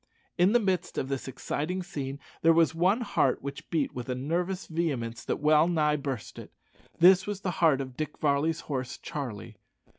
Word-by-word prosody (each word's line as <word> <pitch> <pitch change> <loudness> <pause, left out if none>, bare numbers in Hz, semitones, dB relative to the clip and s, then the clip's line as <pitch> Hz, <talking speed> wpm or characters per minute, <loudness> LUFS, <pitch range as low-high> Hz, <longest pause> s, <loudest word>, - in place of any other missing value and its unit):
In 185 +4 +4
the 240 - +6
midst 190 -5 -1
of 130 - -2
this 135 -1 -3
exciting 150 +7 -3
scene 140 -6 -5 0.2
there 165 0 +6
was 165 -1 +4
one 185 +8 +2
heart 170 - +1
which 140 0 -7
beat 160 -5 0
with 125 0 -6
a 125 - -1
nervous 175 +8 -2
vehemence 140 -9 -2
that - - -2
well 155 +2 +4
nigh 155 -3 +2
burst 135 -8 -5
it. - - -11 0.5
This 185 +3 +6
was 205 -2 -4
the 185 - -1
heart 155 -5 +5
of 130 -2 -7
Dick 155 +2 -4
Varley's 150 +2 +1
horse, 130 -3 -4
Charlie. 135 -10 -6
155 Hz, 185 wpm, -28 LUFS, 135-175 Hz, 0.5 s, the